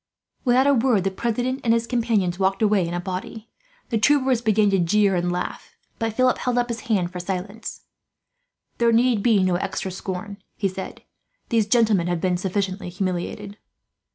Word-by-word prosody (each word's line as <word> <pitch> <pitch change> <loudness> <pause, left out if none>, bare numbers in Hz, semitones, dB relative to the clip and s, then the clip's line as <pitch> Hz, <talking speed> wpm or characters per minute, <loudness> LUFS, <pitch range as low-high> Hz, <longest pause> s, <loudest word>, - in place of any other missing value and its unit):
Without 255 +1 +4
a 285 - +5
word, 235 -6 +2
the 195 - 0
president 245 +6 -2
and 230 -2 +3
his 230 0 0
companions 225 -7 0
walked 195 +2 +1
away 205 -5 +3
in 170 - -4
a - - -1
body. 190 +5 -6 0.4
The 225 - 0
troopers 260 0 +3
began 215 -2 +3
to 195 - +2
jeer 200 +3 +3
and 175 0 0
laugh, 180 - -5 0.2
but 225 -1 -1
Philip 255 +2 +2
held 250 -1 -1
up 245 0 +1
his 230 -1 -3
hand 185 -5 +1
for 180 - -6
silence. 190 +4 -5 1.0
"There 235 -1 +4
need 235 -1 +3
be 210 -3 +3
no 180 -1 +2
extra 190 +1 -3
scorn," 190 +2 -6 0.2
he 200 - +1
said. 190 0 -7 0.5
"These 225 -3 +2
gentlemen 215 -6 +3
have 175 -1 -1
been 180 +1 0
sufficiently 190 0 -2
humiliated." 190 +3 -4
205 Hz, 180 wpm, -23 LUFS, 185-230 Hz, 1.0 s, a